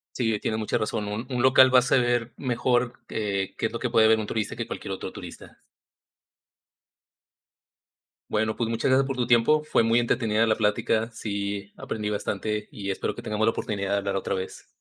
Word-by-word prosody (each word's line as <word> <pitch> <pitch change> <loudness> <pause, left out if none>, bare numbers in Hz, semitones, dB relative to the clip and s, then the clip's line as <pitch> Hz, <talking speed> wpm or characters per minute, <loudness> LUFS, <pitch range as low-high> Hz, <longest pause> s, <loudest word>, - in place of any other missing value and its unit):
Sí, 115 -4 0
tienes 110 +1 -2
mucha 110 - 0
razón, 105 -1 -2
un 105 +4 -4
un 125 -2 -1
local 130 0 +6
va 130 - +9
a - - +1
saber 120 -2 +1
mejor, 125 -1 0 0.2
eh, 100 -3 -2
qué - - 0
es - - -11
lo 115 - -4
que 125 - -1
puede 110 -2 +5
ver 110 0 +5
un 110 - -3
turista, 105 0 -3
que - - -4
cualquier - - -5
otro - - -6
turista. - - -11 2.7
Bueno, 110 +1 0
pues, 115 -2 -1
muchas 115 +3 0
gracias 135 +1 +4
por 135 - -2
tu 125 -1 0
tiempo, 120 +6 +4
fue 155 -6 +2
muy 115 +1 +3
entretenida 115 -2 +1
la 110 -1 +2
plática, 110 +1 +1
sí, 100 -2 -4
aprendí 105 -1 -4
bastante, 105 +1 -2
y 100 -1 -4
espero 95 - -3
que - - -7
tengamos 110 0 -1
la - - +5
oportunidad 100 -3 -3
de 100 - +2
hablar 100 0 -2
otra - - -2
vez. 95 0 -5
110 Hz, 200 wpm, -26 LUFS, 105-120 Hz, 2.7 s, va